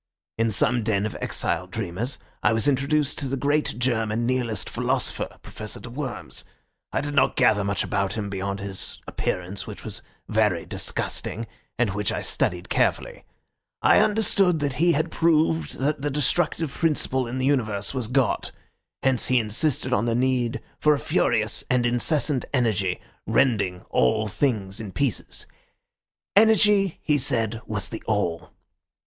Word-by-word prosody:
In 115 0 +3
some 120 +3 +2
den 105 -2 0
of 110 - -4
exiled - - -1
dreamers 115 +10 -3 0.2
I 105 - +3
was 115 +5 +1
introduced 145 +1 +1
to 140 - -2
the 135 +1 -2
great 145 -2 0
German 115 -2 0
Nihilist 120 -4 -1
philosopher, - - -1
Professor 110 -1 -6
de 125 - -9
Worms. 135 -1 -5 0.5
I - - 0
did 145 +1 -4
not 135 -2 +3
gather 110 -6 +4
much 100 0 0
about 100 -1 -1
him 110 -2 -3
beyond 100 0 -3
his 100 -1 -4
appearance, 90 +2 -3
which - - -8
was - - -5 0.3
very 105 -6 +1
disgusting, 115 - -2 0.3
and 115 -4 +2
which 105 +1 -1
I - - -3
studied 90 0 0
carefully. - - 0 0.6
I - - +6
understood 200 -4 +3
that 140 -3 -1
he 170 +2 +4
had 155 +3 0
proved 160 0 +2
that 145 +2 -1
the 145 - 0
destructive 150 +2 +1
principle 135 -6 0
in 120 +2 -4
the 130 - 0
universe 110 -8 0
was 125 -4 -2
God; 130 +1 +1 0.5
hence 130 -2 +3
he 130 - +3
insisted 125 +4 +1
on 110 -1 +2
the 115 -1 +1
need 125 -1 +1 0.2
for 150 0 +4
a - - -4
furious - - +1
and 125 -1 +2
incessant 130 +3 +1
energy, 105 -8 +1 0.3
rending 100 -9 +2
all 65 - +2
things 105 -3 -1
in 105 -4 -7
pieces. 140 -7 -2 0.9
Energy, 210 -3 +5
he 150 -2 +2
said, 115 -4 +1
was 105 -3 -2
the 110 - -6
All. 90 -6 -1
120 Hz, 155 wpm, -25 LUFS, 105-145 Hz, 0.9 s, I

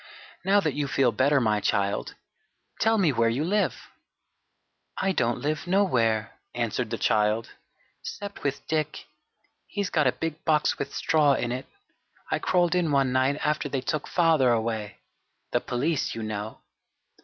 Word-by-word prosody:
"Now 195 +2 +4
that 155 -6 0
you 145 0 -2
feel 135 -2 +2
better, 140 +6 +3
my 110 -4 +2
child, 100 0 -1 0.6
tell 225 +1 +3
me 180 -7 +3
where 115 -2 +2
you 125 +6 -1
live?" 205 +5 0 1.1
"I 195 - +1
don't 120 -9 0
live 155 +4 -2
nowhere," 120 - +1 0.2
answered 120 0 -1
the - - -2
child, 105 +2 +1 0.5
"'cept 200 0 -7
with 140 0 -3
Dick 155 -1 -2 0.6
he's 200 -3 -3
got 150 -4 +3
a - - +4
big 160 +2 -5
box 155 -2 +2
with - - -3
straw 155 -5 +3
in 120 - -2
it. 130 +2 -4 0.6
I - - +1
crawled 175 -2 +2
in 175 -4 +1
one 135 -2 +2
night 130 +2 +2
after 150 -1 0
they 135 -1 -2
took 150 +2 -2
father 160 -7 +3
away 110 -3 -2 0.5
the - - +1
police, 140 +5 -1
you 115 - -4
know." 110 0 -5
140 Hz, 155 wpm, -26 LUFS, 115-165 Hz, 1.1 s, Now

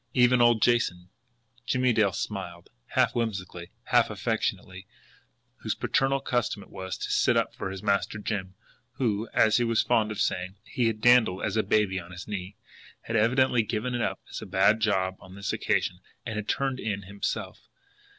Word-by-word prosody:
Even 125 -1 +5
old 120 -2 +4
Jason 95 -7 +1 0.5
Jimmie 125 -1 +1
Dale 105 -3 +3
smiled, 90 -3 -6 0.2
half - - +3
whimsically, 95 -7 -3
half - - +3
affectionately 95 0 -3 0.7
whose - - -3
paternal 135 0 +1
custom 120 -6 -1
it - - -19
was 95 0 -5
to - - -4
sit - - +3
up - - 0
for - - -5
his 95 +1 -7
Master 100 0 0
Jim, 100 -3 -4 0.4
who, 110 -3 -1
as 110 -1 +4
he 120 - +2
was 115 -1 +2
fond 110 -3 +2
of 105 - -5
saying, 90 +2 -1
he 120 -2 -1
had 110 -1 -2
dandled 120 -6 +4
as 105 - -1
a 110 - +3
baby 105 -3 +1
on 85 -1 -11
his 90 0 -9
knee, 100 -2 -5 0.5
had 115 - -4
evidently 120 +2 +3
given 115 +3 -3
it 120 - -1
up - - -1
as - - -5
a - - -8
bad 100 +3 +3
job 95 -4 0
on 95 0 -13
this 100 0 -3
occasion 90 - 0 0.3
and 115 -2 -4
had 105 0 -4
turned 135 -2 0
in 100 -2 -3
himself. 100 +1 -5
105 Hz, 180 wpm, -27 LUFS, 95-120 Hz, 0.7 s, Even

